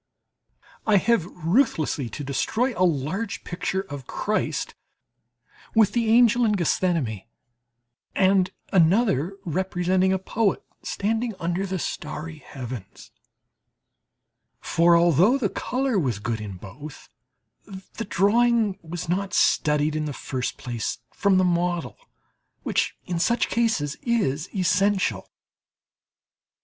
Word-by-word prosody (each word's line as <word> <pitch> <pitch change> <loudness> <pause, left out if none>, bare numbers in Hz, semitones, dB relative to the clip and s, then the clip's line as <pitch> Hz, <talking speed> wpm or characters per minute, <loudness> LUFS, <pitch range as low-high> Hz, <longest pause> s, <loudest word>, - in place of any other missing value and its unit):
I 210 -2 +5
have 210 -3 +2
ruthlessly 165 - 0
to 145 +7 -6
destroy 220 - 0
a - - -4
large 180 +6 -1
picture 190 +2 -2
of 145 -9 -9
Christ 215 +1 -2 1.0
with 220 -3 +5
the 235 -2 0
angel 240 +1 +5
in 215 -2 +3
Gethsemane, 165 - 0 0.9
and 190 -1 +3 0.2
another 185 - +3
representing 185 +2 +1
a 190 - +2
poet 200 +2 0 0.2
standing 225 +2 -2
under 175 +3 -1
the 190 0 -2
starry 160 -2 -5
heavens; 125 -8 -9 1.5
for, 170 +1 +4
although 175 - +4
the 225 -7 0
colour 255 -1 -1
was 125 - -1
good 110 +1 -3
in 105 -2 -6
both, 115 +11 -11 0.9
the 230 - -4
drawing 215 +1 +2
was 170 +1 -6
not 190 +2 -1
studied 150 0 +2
in 155 0 -1
the 145 - -4
first 125 0 -4
place 120 -2 -4 0.2
from 200 -2 +2
the 185 - +4
model, 175 -1 0 0.7
which - - 0
in 175 -2 -2
such 235 +7 +1
cases 220 -12 0
is 195 - 0
essential. 185 - +1
180 Hz, 115 wpm, -24 LUFS, 150-205 Hz, 1.5 s, I